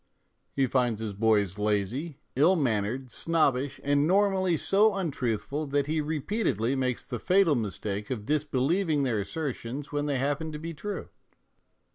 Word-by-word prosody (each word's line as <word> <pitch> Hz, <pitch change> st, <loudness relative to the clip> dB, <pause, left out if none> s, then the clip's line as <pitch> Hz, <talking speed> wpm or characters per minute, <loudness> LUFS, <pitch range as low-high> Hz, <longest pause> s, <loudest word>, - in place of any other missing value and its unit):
He 135 Hz, -, +3 dB
finds 120 Hz, -4 st, +1 dB
his 110 Hz, -2 st, -4 dB
boys 105 Hz, -2 st, +2 dB
lazy, 105 Hz, -, -1 dB, 0.2 s
ill 160 Hz, +8 st, +5 dB
mannered, 125 Hz, -, -1 dB
snobbish, 145 Hz, -5 st, +1 dB
and 145 Hz, +1 st, +2 dB
normally 190 Hz, -2 st, +3 dB
so 205 Hz, +5 st, +3 dB
untruthful 145 Hz, -, -2 dB
that 140 Hz, 0 st, +1 dB
he 155 Hz, +1 st, 0 dB
repeatedly 150 Hz, -, -1 dB
makes 130 Hz, -2 st, -1 dB
the -, -, -4 dB
fatal 185 Hz, -3 st, +4 dB
mistake 105 Hz, -3 st, -3 dB
of 110 Hz, -5 st, -4 dB
disbelieving 150 Hz, -, +1 dB
their 120 Hz, -5 st, 0 dB
assertions 135 Hz, +3 st, -4 dB
when 145 Hz, 0 st, -1 dB
they 140 Hz, -2 st, 0 dB
happen 145 Hz, +4 st, -1 dB
to -, -, -4 dB
be 165 Hz, +2 st, -6 dB
true. 205 Hz, +7 st, -5 dB
140 Hz, 145 wpm, -28 LUFS, 115-160 Hz, 0.2 s, ill